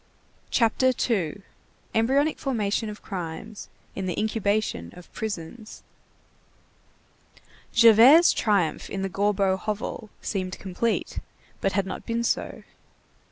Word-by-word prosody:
CHAPTER 255 Hz, +2 st, +3 dB, 0.2 s
II—EMBRYONIC 225 Hz, -, -1 dB
FORMATION 220 Hz, -4 st, -1 dB
OF 210 Hz, -, -9 dB
CRIMES 190 Hz, +3 st, -6 dB, 0.3 s
IN 190 Hz, -1 st, -3 dB
THE 180 Hz, -, -2 dB
INCUBATION 215 Hz, -, -1 dB
OF 180 Hz, -, -15 dB
PRISONS 215 Hz, +1 st, -6 dB, 1.9 s
Javert's 235 Hz, +8 st, +7 dB
triumph 200 Hz, -8 st, 0 dB
in 195 Hz, -1 st, -3 dB
the 195 Hz, -, -2 dB
Gorbeau 195 Hz, 0 st, +1 dB
hovel 215 Hz, +1 st, -4 dB
seemed 185 Hz, -2 st, -3 dB
complete, 200 Hz, +4 st, -2 dB, 0.4 s
but 195 Hz, -, 0 dB
had 200 Hz, 0 st, +1 dB
not 190 Hz, -, -7 dB
been 235 Hz, 0 st, -1 dB
so. -, -, -2 dB
210 Hz, 105 wpm, -25 LUFS, 190-230 Hz, 1.9 s, Javert's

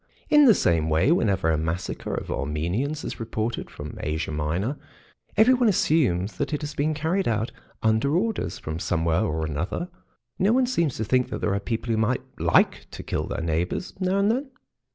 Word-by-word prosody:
In 295 Hz, -1 st, +7 dB
the 230 Hz, -6 st, +7 dB
same 80 Hz, -, +2 dB
way, 80 Hz, -, +3 dB
whenever 95 Hz, -, +2 dB
a 80 Hz, -, +1 dB
massacre 80 Hz, +3 st, -3 dB
of -, -, -5 dB
Armenians 85 Hz, -, -2 dB
is -, -, -5 dB
reported 115 Hz, 0 st, -3 dB
from 75 Hz, 0 st, -8 dB
Asia 80 Hz, +1 st, -2 dB
Minor 85 Hz, -, -1 dB, 0.6 s
everyone 245 Hz, +1 st, +5 dB
assumes 130 Hz, -, +1 dB
that 145 Hz, +2 st, -2 dB
it 150 Hz, -, -5 dB
has 150 Hz, 0 st, -4 dB
been 150 Hz, +2 st, 0 dB
carried 165 Hz, +6 st, 0 dB
out 115 Hz, +1 st, 0 dB, 0.3 s
"under 110 Hz, +8 st, +2 dB
orders" 205 Hz, -, -1 dB
from 80 Hz, +1 st, -5 dB
somewhere 85 Hz, 0 st, +1 dB
or 80 Hz, -6 st, -1 dB
another; 80 Hz, -, -3 dB, 0.5 s
no 200 Hz, +4 st, +3 dB
one 260 Hz, +1 st, +4 dB
seems 170 Hz, -, 0 dB
to 110 Hz, -, -1 dB
think 125 Hz, +3 st, +2 dB
that -, -, -3 dB
there 100 Hz, -, 0 dB
are 100 Hz, -, 0 dB
people 115 Hz, +3 st, -3 dB
who 110 Hz, -, +1 dB
might 115 Hz, +3 st, +1 dB, 0.2 s
like -, -, +3 dB
to -, -, -8 dB
kill -, -, -2 dB
their -, -, -3 dB
neighbours 85 Hz, -, -2 dB
now 185 Hz, +1 st, +1 dB
and 200 Hz, +2 st, +3 dB
then. 265 Hz, +4 st, -2 dB
110 Hz, 190 wpm, -25 LUFS, -, 0.6 s, In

